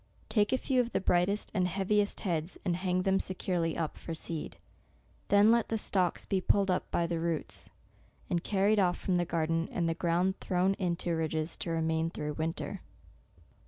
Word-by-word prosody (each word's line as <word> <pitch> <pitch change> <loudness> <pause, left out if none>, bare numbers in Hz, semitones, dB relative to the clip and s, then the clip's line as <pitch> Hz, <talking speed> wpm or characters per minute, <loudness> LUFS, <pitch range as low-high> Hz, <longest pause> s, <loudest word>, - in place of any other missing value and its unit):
Take 210 -2 +2
a 260 - +3
few 255 -1 +2
of 240 -1 -4
the - - +2
brightest 185 +3 +1
and 185 -3 +2
heaviest 200 +3 0
heads, 170 -2 -2
and 175 -3 +1
hang 185 0 0
them 195 0 +2
securely 180 -3 -1
up 160 -2 -2
for 165 - -5
seed. 160 0 -4 0.7
Then 205 +2 +6
let 235 -1 +2
the 225 - 0
stalks 185 -4 0
be 190 -1 0
pulled 195 0 +2
up 180 - -1
by 170 - +1
the 170 -1 -2
roots, 165 -2 -3 0.6
and 175 -1 -1
carried 205 +1 +2 0.2
from 185 -2 0
the 175 - +1
garden, 165 0 0
and 170 -2 0
the 165 - +1
ground 175 +3 0
thrown 185 +1 +1
into 175 -2 -1
ridges* 160 0 -1
to - - -4
remain 160 0 0
through 150 -2 -4
winter. 160 +2 -3
180 Hz, 180 wpm, -31 LUFS, 165-195 Hz, 0.7 s, Then